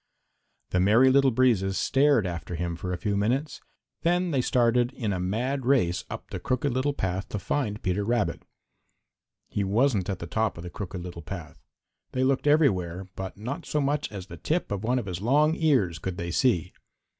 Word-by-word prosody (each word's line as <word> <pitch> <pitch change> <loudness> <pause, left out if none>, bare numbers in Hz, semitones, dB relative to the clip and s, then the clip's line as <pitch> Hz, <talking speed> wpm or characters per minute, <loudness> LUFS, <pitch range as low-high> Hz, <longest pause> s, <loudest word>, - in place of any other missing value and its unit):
The 90 - +2
Merry 115 +8 +5
Little 135 0 +5
Breezes 110 -6 +2
stared 140 -5 +3
after 85 0 -4
him 85 0 -2
for 90 +2 -5
a 90 - -1
few 100 +3 -1
minutes, 130 +9 -1 0.4
then 175 +1 +1
they 135 -4 +2
started 120 0 +2
in 110 -7 -2
a 90 - -2
mad 120 +9 -1
race 95 -9 +2
up - - -8
the - - -4
Crooked 130 +1 -1
Little 130 +3 0
Path 95 -2 -2
to - - -3
find 105 +1 -2
Peter 95 +1 0
Rabbit. 105 -6 0 1.1
He 100 - -2
wasn't 105 -1 +1
at 95 - -1
the 85 - -6
top 110 +3 -1
of 85 - -7
the 90 - -7
Crooked 95 -2 -6
Little 85 -1 -7
Path. 85 -1 -8 0.5
They 130 - +1
looked 135 +2 +1
everywhere, 95 - +2
but 95 0 -6
not 120 +7 -5
so 150 - 0
much 145 -1 0
as 100 -3 -6
the 105 - -10
tip 165 -4 -1
of 100 0 -2
one 125 +3 +1
of 120 - -2
his 90 -1 -5
long 150 +7 +3
ears 125 - +2
could 95 -1 -4
they 85 0 -3
see. 90 -4 +1
105 Hz, 195 wpm, -27 LUFS, 90-135 Hz, 1.1 s, Merry